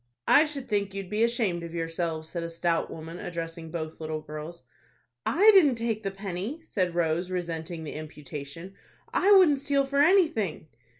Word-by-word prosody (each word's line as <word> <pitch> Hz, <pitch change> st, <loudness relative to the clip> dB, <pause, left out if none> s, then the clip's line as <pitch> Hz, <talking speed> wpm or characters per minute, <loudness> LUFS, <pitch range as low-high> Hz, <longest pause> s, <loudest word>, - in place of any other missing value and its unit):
"I 300 Hz, -, +7 dB
should 285 Hz, -4 st, -5 dB
think 200 Hz, -2 st, -1 dB
you'd 195 Hz, -1 st, -6 dB
be 215 Hz, +2 st, +2 dB
ashamed 230 Hz, -7 st, +1 dB
of 170 Hz, 0 st, -7 dB
yourselves," 165 Hz, -1 st, -2 dB
said 170 Hz, +1 st, -4 dB
a 170 Hz, -, -4 dB
stout 165 Hz, 0 st, 0 dB
woman, 165 Hz, +2 st, -8 dB
addressing 165 Hz, -1 st, -6 dB
both 160 Hz, -1 st, -5 dB
little 155 Hz, 0 st, -3 dB
girls. 155 Hz, +1 st, -8 dB, 0.6 s
"I 410 Hz, +7 st, +6 dB
didn't 305 Hz, -10 st, +6 dB
take 230 Hz, -2 st, -2 dB
the 195 Hz, -, -2 dB
penny," 195 Hz, -, -5 dB
said 185 Hz, -, -1 dB
Rose, 170 Hz, +1 st, 0 dB
resenting 170 Hz, -2 st, -4 dB
the 150 Hz, -, -6 dB
imputation; 150 Hz, +3 st, -8 dB, 0.4 s
"I 400 Hz, -, +3 dB
wouldn't 340 Hz, -8 st, +6 dB
steal 280 Hz, 0 st, +1 dB
for 280 Hz, +1 st, -1 dB
anything." 290 Hz, -, +3 dB
175 Hz, 170 wpm, -27 LUFS, 165-235 Hz, 0.6 s, I